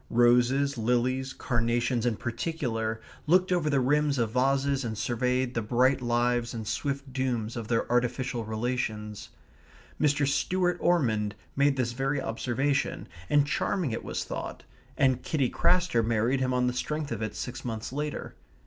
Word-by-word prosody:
Roses, 125 Hz, +3 st, +3 dB
lilies, 125 Hz, +3 st, +1 dB
carnations 120 Hz, -1 st, 0 dB
in 115 Hz, -, +1 dB
particular, 115 Hz, -3 st, -2 dB, 0.3 s
looked 185 Hz, +3 st, +4 dB
over 170 Hz, -4 st, +2 dB
the 140 Hz, -2 st, +3 dB
rims 145 Hz, +2 st, +2 dB
of 115 Hz, -3 st, 0 dB
vases 135 Hz, +2 st, +1 dB
and 110 Hz, -3 st, -3 dB
surveyed 125 Hz, +2 st, 0 dB
the 120 Hz, -, 0 dB
bright 125 Hz, +5 st, +2 dB
lives 120 Hz, 0 st, +1 dB
and 110 Hz, -2 st, -5 dB
swift 140 Hz, +1 st, -3 dB
dooms 120 Hz, -4 st, -1 dB
of 115 Hz, -2 st, -5 dB
their 115 Hz, -1 st, +1 dB
artificial 125 Hz, 0 st, 0 dB
relations. 110 Hz, -2 st, -3 dB, 0.7 s
Mr. 145 Hz, -1 st, +3 dB
Stuart 175 Hz, +6 st, +1 dB
Ormond 110 Hz, -, +1 dB, 0.2 s
made 140 Hz, 0 st, +3 dB
this 125 Hz, -2 st, 0 dB
very 135 Hz, +3 st, 0 dB
observation; 130 Hz, +3 st, -1 dB, 0.2 s
and 145 Hz, -1 st, +4 dB
charming 155 Hz, 0 st, 0 dB
it 110 Hz, -, -3 dB
was -, -, -3 dB
thought; -, -, -6 dB, 0.3 s
and 130 Hz, -2 st, +3 dB
Kitty 140 Hz, -6 st, 0 dB
Craster 180 Hz, -10 st, +2 dB
married 115 Hz, +4 st, +1 dB
him 130 Hz, -1 st, 0 dB
on 125 Hz, 0 st, +2 dB
the 125 Hz, -, +1 dB
strength 150 Hz, +3 st, -3 dB
of 115 Hz, -2 st, -3 dB
it 110 Hz, -1 st, -3 dB
six 125 Hz, -, -5 dB
months 115 Hz, 0 st, -4 dB
later. 150 Hz, +1 st, -4 dB
125 Hz, 155 wpm, -28 LUFS, 115-140 Hz, 0.7 s, looked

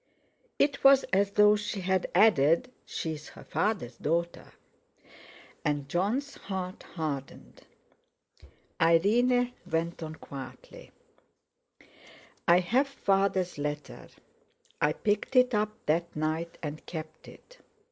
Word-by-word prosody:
It 280 Hz, -1 st, +1 dB
was 275 Hz, 0 st, +7 dB
as 200 Hz, +1 st, +3 dB
though 210 Hz, 0 st, +6 dB
she 205 Hz, -1 st, -4 dB
had 185 Hz, 0 st, 0 dB
added: 185 Hz, -, +4 dB, 0.2 s
"She 160 Hz, -, -3 dB
is 155 Hz, 0 st, -9 dB
her -, -, -13 dB
father's 185 Hz, -, -2 dB
daughter!" 170 Hz, +3 st, -2 dB, 1.1 s
And 145 Hz, -2 st, -1 dB
Jon's 210 Hz, -, -1 dB
heart 185 Hz, -2 st, -5 dB
hardened. 145 Hz, -5 st, -6 dB, 1.2 s
Irene 240 Hz, +9 st, +3 dB, 0.2 s
went 165 Hz, +1 st, -2 dB
on 160 Hz, -1 st, -6 dB
quietly: 135 Hz, -3 st, -10 dB, 1.6 s
"I 175 Hz, +1 st, +6 dB
have 250 Hz, +10 st, +2 dB
Father's 195 Hz, -, 0 dB
letter. 150 Hz, 0 st, -5 dB, 0.7 s
I 150 Hz, +1 st, +3 dB
picked 210 Hz, -, -1 dB
it 250 Hz, 0 st, +5 dB
up 215 Hz, 0 st, 0 dB
that 170 Hz, +3 st, 0 dB
night 160 Hz, +2 st, -2 dB
and 150 Hz, 0 st, -5 dB
kept 155 Hz, -1 st, -8 dB
it. -, -, -16 dB
180 Hz, 110 wpm, -29 LUFS, 155-215 Hz, 1.6 s, was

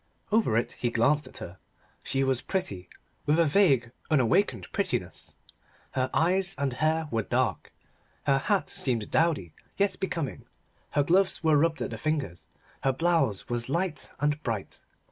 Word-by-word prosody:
Over 210 Hz, -, +3 dB
it 115 Hz, -, 0 dB
he 120 Hz, -, -2 dB
glanced 140 Hz, +6 st, +2 dB
at -, -, -12 dB
her. 85 Hz, +2 st, -8 dB, 0.4 s
She 135 Hz, 0 st, +1 dB
was 130 Hz, -2 st, +1 dB
pretty 100 Hz, -, -3 dB, 0.4 s
with 150 Hz, +2 st, +4 dB
a 170 Hz, -, +5 dB
vague 140 Hz, -, +3 dB, 0.2 s
unawakened 155 Hz, -, +2 dB
prettiness. 120 Hz, -, -2 dB, 0.6 s
Her 130 Hz, -1 st, 0 dB
eyes 185 Hz, +3 st, +2 dB
and 140 Hz, -2 st, -1 dB
hair 155 Hz, +3 st, +1 dB
were 115 Hz, -, +1 dB
dark. -, -, -1 dB, 0.5 s
Her 135 Hz, -1 st, +3 dB
hat 200 Hz, +7 st, +1 dB
seemed 115 Hz, -5 st, -1 dB
dowdy, 155 Hz, -, +1 dB, 0.2 s
yet 195 Hz, -2 st, +1 dB
becoming. 170 Hz, -7 st, -3 dB, 0.4 s
Her 145 Hz, -, +2 dB
gloves 185 Hz, +4 st, +2 dB
were 160 Hz, -1 st, +4 dB
rubbed 160 Hz, +2 st, +2 dB
at -, -, -4 dB
the -, -, -6 dB
fingers. 150 Hz, -, -2 dB, 0.4 s
Her 135 Hz, -, +3 dB
blouse 165 Hz, -, +1 dB
was 120 Hz, 0 st, -3 dB
light 170 Hz, +2 st, -1 dB
and 145 Hz, +1 st, 0 dB
bright. 110 Hz, -7 st, -4 dB
145 Hz, 155 wpm, -28 LUFS, 120-170 Hz, 0.6 s, a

